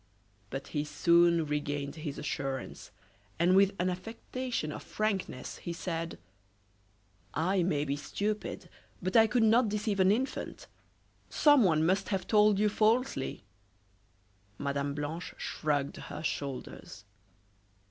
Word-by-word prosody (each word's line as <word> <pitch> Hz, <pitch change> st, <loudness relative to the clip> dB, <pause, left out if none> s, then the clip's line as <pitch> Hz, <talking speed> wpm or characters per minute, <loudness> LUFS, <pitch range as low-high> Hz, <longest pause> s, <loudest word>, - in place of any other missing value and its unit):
But 135 Hz, +4 st, -6 dB
he 150 Hz, -2 st, -1 dB
soon 170 Hz, +1 st, +4 dB
regained 145 Hz, -1 st, -2 dB
his 150 Hz, -3 st, -5 dB
assurance, 135 Hz, -3 st, -4 dB, 0.5 s
and 175 Hz, +3 st, +4 dB
with 195 Hz, 0 st, +5 dB
an 180 Hz, -, 0 dB
affectation 225 Hz, 0 st, -4 dB
of -, -, -6 dB
frankness 200 Hz, -11 st, -3 dB
he 170 Hz, -, -5 dB
said: 165 Hz, -1 st, -4 dB, 1.2 s
"I 180 Hz, +4 st, +2 dB
may 150 Hz, -4 st, +1 dB
be 140 Hz, -1 st, -1 dB
stupid, 205 Hz, +8 st, -3 dB, 0.3 s
but 185 Hz, +1 st, -3 dB
I 225 Hz, -1 st, +7 dB
could 235 Hz, +1 st, +2 dB
not 225 Hz, +1 st, +4 dB
deceive 210 Hz, -1 st, -1 dB
an 190 Hz, +1 st, +5 dB
infant. 255 Hz, +6 st, -2 dB, 0.6 s
Someone 195 Hz, -, +5 dB
must 190 Hz, +3 st, +1 dB
have 195 Hz, -2 st, -1 dB
told 210 Hz, -1 st, +4 dB
you 210 Hz, +1 st, +3 dB
falsely." 215 Hz, -, +1 dB, 1.1 s
Mme. 140 Hz, 0 st, -2 dB
Blanche 150 Hz, +4 st, -5 dB
shrugged 145 Hz, -2 st, -1 dB
her -, -, -7 dB
shoulders. 135 Hz, -9 st, -5 dB
175 Hz, 120 wpm, -31 LUFS, 150-210 Hz, 1.2 s, I